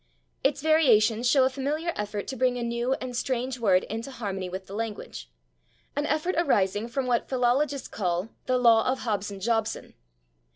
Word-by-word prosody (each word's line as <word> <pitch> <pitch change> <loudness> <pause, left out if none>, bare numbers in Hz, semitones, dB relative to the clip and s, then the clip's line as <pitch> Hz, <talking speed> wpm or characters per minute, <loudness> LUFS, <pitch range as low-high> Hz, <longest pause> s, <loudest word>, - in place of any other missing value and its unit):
Its 275 +1 +1
variations 245 -7 +4
show 270 -1 +5
a 260 - +3
familiar 300 +5 -2
effort 205 -1 -3
to 265 - -5
bring 250 0 +1
a 240 - -3
new 235 +2 0
and 255 -2 -5
strange 255 0 -2
word 190 -5 +3
into 225 +4 -5
harmony 195 -7 -4
with 190 +1 -6
the 195 - -11
language 205 - -5 0.7
an 290 +1 -1
effort 330 +5 0
arising 210 - +1
from 260 +2 -2
what 245 -2 0
philologists 265 +2 +1
call 180 0 -2 0.2
the 255 0 +2
law 230 -2 +5
of 265 - -3
Hobson 205 -3 -2
Jobson. 225 +1 -1
240 Hz, 170 wpm, -27 LUFS, 210-265 Hz, 0.7 s, show